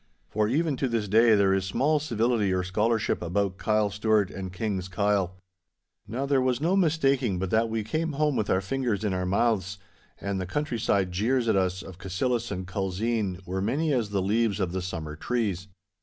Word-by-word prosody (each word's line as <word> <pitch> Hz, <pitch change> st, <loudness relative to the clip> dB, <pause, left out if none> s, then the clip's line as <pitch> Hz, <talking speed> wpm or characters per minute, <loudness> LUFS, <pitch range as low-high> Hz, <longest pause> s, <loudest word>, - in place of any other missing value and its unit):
For 105 Hz, 0 st, +1 dB
even 145 Hz, +3 st, +1 dB
to 135 Hz, -, 0 dB
this 115 Hz, -4 st, -1 dB
day 110 Hz, +2 st, +5 dB
there 100 Hz, -1 st, +3 dB
is 95 Hz, -1 st, +1 dB
small 145 Hz, +10 st, +1 dB
civility 115 Hz, -7 st, +1 dB
or 90 Hz, 0 st, +1 dB
scholarship 105 Hz, +4 st, 0 dB
about 95 Hz, +2 st, -1 dB
Kyle 105 Hz, -1 st, +1 dB
Stewart 105 Hz, -1 st, +1 dB
and 95 Hz, -1 st, -6 dB
King's 95 Hz, -1 st, -3 dB
Kyle. 95 Hz, -1 st, 0 dB, 0.7 s
Now 125 Hz, +6 st, -2 dB
there 140 Hz, -1 st, +2 dB
was 130 Hz, -1 st, +1 dB
no 170 Hz, +6 st, +2 dB
mistaking 140 Hz, -, +2 dB
but 90 Hz, 0 st, -3 dB
that 115 Hz, +1 st, +2 dB
we 110 Hz, -1 st, -1 dB
came 155 Hz, +9 st, -2 dB
home 150 Hz, 0 st, +1 dB
with 105 Hz, -, -1 dB
our 95 Hz, -, +2 dB
fingers 115 Hz, 0 st, -1 dB
in 105 Hz, -3 st, 0 dB
our 90 Hz, 0 st, -1 dB
mouths, 100 Hz, -1 st, +1 dB, 0.4 s
and 100 Hz, -1 st, -2 dB
the 95 Hz, -, -4 dB
countryside 105 Hz, -, 0 dB
jeers 115 Hz, +6 st, +1 dB
at 110 Hz, -, +3 dB
us 95 Hz, -1 st, 0 dB
of 95 Hz, -1 st, -11 dB
Cassillis 115 Hz, +6 st, -1 dB
and 95 Hz, -2 st, -4 dB
Culzean 95 Hz, +1 st, -2 dB
were 95 Hz, +2 st, -3 dB
many 145 Hz, +9 st, 0 dB
as 115 Hz, -5 st, 0 dB
the 100 Hz, -2 st, 0 dB
leaves 105 Hz, +1 st, +1 dB
of 95 Hz, -3 st, 0 dB
the 95 Hz, +1 st, -2 dB
summer 80 Hz, -4 st, -5 dB
trees. 100 Hz, 0 st, -2 dB
105 Hz, 195 wpm, -27 LUFS, 95-120 Hz, 0.7 s, day